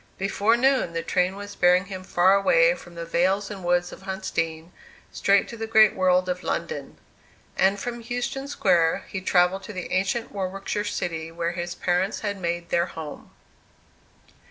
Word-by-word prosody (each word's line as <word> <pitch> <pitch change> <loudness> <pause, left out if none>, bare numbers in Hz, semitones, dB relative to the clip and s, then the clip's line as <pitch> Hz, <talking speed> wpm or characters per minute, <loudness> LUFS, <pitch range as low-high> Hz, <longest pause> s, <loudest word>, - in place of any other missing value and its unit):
Before 200 +4 +2
noon 265 -8 +2
the 165 0 -2
train 180 +2 +1
was 205 0 -8
bearing 180 +1 +4
him 190 -2 -7
far 185 +1 +3
away - - +4
from 175 - -12
the 170 0 -5
vales 190 +5 +1
and 195 -3 -7
woods 175 0 +1
of - - -11
Huntsdean, 170 -4 -3 0.4
straight 200 0 +2
to 230 - -8
the 225 0 -4
great 220 -2 +6
world 185 0 +2
of 180 0 -2
London. 475 - -4 0.6
And 195 +1 +2
from 240 +2 -5
Euston 245 +3 -3
Square 175 -11 +2
he 190 - -4
travelled 180 +1 +2
to 210 - -8
the 185 -2 -6
ancient 195 +5 0
Warwickshire 195 +2 -3
city 165 -5 -3
where 170 0 -2
his 175 0 -5
parents 180 +3 0
had 200 -2 -3
made 170 0 -3
their 170 +1 +1
home. 160 -4 -8
185 Hz, 170 wpm, -25 LUFS, 175-205 Hz, 0.6 s, great